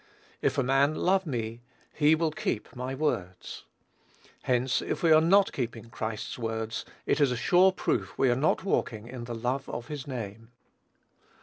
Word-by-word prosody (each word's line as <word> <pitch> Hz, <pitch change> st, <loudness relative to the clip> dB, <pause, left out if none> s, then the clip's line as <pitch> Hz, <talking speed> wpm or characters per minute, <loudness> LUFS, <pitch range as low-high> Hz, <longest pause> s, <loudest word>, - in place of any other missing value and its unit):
"If -, -, +1 dB
a 135 Hz, -, +3 dB
man 135 Hz, +4 st, +3 dB
love 190 Hz, +1 st, +2 dB
me, 115 Hz, -3 st, -3 dB, 0.3 s
he 150 Hz, +1 st, +4 dB
will 160 Hz, 0 st, 0 dB
keep 115 Hz, -7 st, -3 dB
my 125 Hz, +2 st, -4 dB
words." 110 Hz, -, -3 dB, 0.8 s
Hence, 125 Hz, 0 st, +1 dB
if -, -, -3 dB
we 165 Hz, -, +5 dB
are 155 Hz, 0 st, +7 dB
not 195 Hz, +4 st, +4 dB
keeping 115 Hz, -2 st, -4 dB
Christ's 110 Hz, +1 st, -4 dB
words, 110 Hz, -1 st, -3 dB, 0.2 s
it -, -, +1 dB
is 140 Hz, -3 st, +4 dB
a 125 Hz, -, -1 dB
sure 180 Hz, +10 st, +5 dB
proof 100 Hz, -, -2 dB
we 130 Hz, -2 st, +3 dB
are -, -, +2 dB
not 145 Hz, +8 st, +1 dB
walking 115 Hz, -, -1 dB
in 120 Hz, -1 st, -7 dB
the 120 Hz, 0 st, -5 dB
love 125 Hz, +4 st, -2 dB
of 120 Hz, 0 st, -6 dB
his 145 Hz, -3 st, -6 dB
name. 115 Hz, -3 st, -6 dB
125 Hz, 175 wpm, -28 LUFS, 115-150 Hz, 0.8 s, are